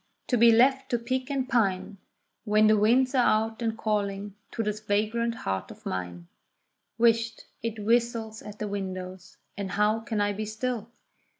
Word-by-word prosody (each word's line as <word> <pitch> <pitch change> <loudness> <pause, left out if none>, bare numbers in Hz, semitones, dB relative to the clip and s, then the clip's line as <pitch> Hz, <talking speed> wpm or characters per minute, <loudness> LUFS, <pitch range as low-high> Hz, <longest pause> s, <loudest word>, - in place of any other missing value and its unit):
to 250 - +1
be 235 0 +7
left 265 +4 +4
to 240 - +1
pique 255 +3 -3
and 270 -2 -1
pine, 200 -4 0 0.4
When 215 -1 +4
the 215 0 +6
winds 245 +5 +3
are 260 - +3
out 220 +1 +1
and 225 -1 -1
calling 205 -2 -2 0.2
to 225 - -3
this 210 0 -2
vagrant 215 +3 0
heart 95 - -3
of - - -13
mine. 90 -2 -5 0.7
Whisht! 230 -1 +2 0.2
it 230 -1 -3
whistles 230 -1 +1
at 210 0 -10
the 215 - -3
windows, 185 -2 -6 0.2
and 200 -2 -4
how 210 +3 +2
can 225 -1 -3
I 205 0 +1
be 215 +2 -4
still? 225 +1 -3
220 Hz, 170 wpm, -27 LUFS, 205-235 Hz, 0.7 s, be